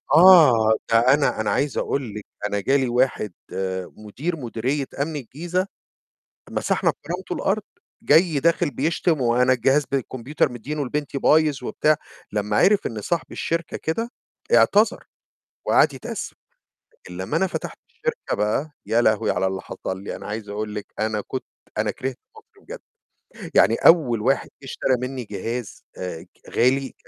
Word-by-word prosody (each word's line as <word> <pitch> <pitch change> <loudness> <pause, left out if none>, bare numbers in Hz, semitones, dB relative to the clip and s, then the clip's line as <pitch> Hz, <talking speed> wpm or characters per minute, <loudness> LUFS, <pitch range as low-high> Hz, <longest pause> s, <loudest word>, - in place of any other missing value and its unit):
آه، 155 -11 +7 0.2
ده 115 - +6 0.2
أنا 145 -6 +1
أنا 105 - 0
عايز 140 -1 0
أقول 125 -7 -2
لِك، 105 - -7 0.2
أنا 100 0 -1
جالي 135 +3 +2
واحد 120 -4 +1 0.6
مدير 130 +11 -4
مديرية 130 +2 -2 0.2
أمن 155 0 -3
الجيزة، 175 - -3 0.8
مسحنا - - +1
بكرامتُه - - -6
الأرض، - - 0 0.4
جاي 160 -1 +4
داخل 170 0 +2
بيشتم، 160 +2 0
وأنا 125 +1 +3
الجهاز 135 +4 +3
بالكمبيوتر 130 +1 -1
مديينُه 145 +5 -4
لبنتي 145 +1 -3
بايظ 150 -4 +3
وبتاع، 155 +4 +2 0.4
لمّا 105 0 -1
عِرف 200 - +4
إن 110 -2 -4
صاحب 170 - -2
الشركة 165 -1 -2
كده 230 +9 -3 0.4
اعتذر 215 +3 +4 0.6
وقعد - - +4
يتأسف، - - -6 0.6
لكن 460 - -13
لمّا - - -2
أنا - - +2
فتحت - - -5
الشركة 480 -1 -3
بقى، 105 +9 0 0.2
يا 115 - +2
لهوي 110 -3 +2
على 95 - +1
اللي 95 0 -2
حصل 95 +1 -6
لي! - - -5
أنا - - -10
عايز 105 0 -5
أقول 105 +1 -4
لِك 105 - -5
أنا 110 -1 0
كنت 130 +5 -5 0.3
أنا - - +1
كرهت 130 -1 -5 0.2
مصر 440 -2 -19
بجد، - - -8 0.7
يعني - - +5
أول 130 -10 +5
واحد 135 +5 +1
جه - - -10
اشترى 130 0 0
مني 125 -1 -4
جهاز 110 +2 -5
آآ، 90 -3 -6 0.2
غالي 130 +2 +1
130 Hz, 150 wpm, -23 LUFS, 110-155 Hz, 0.8 s, آه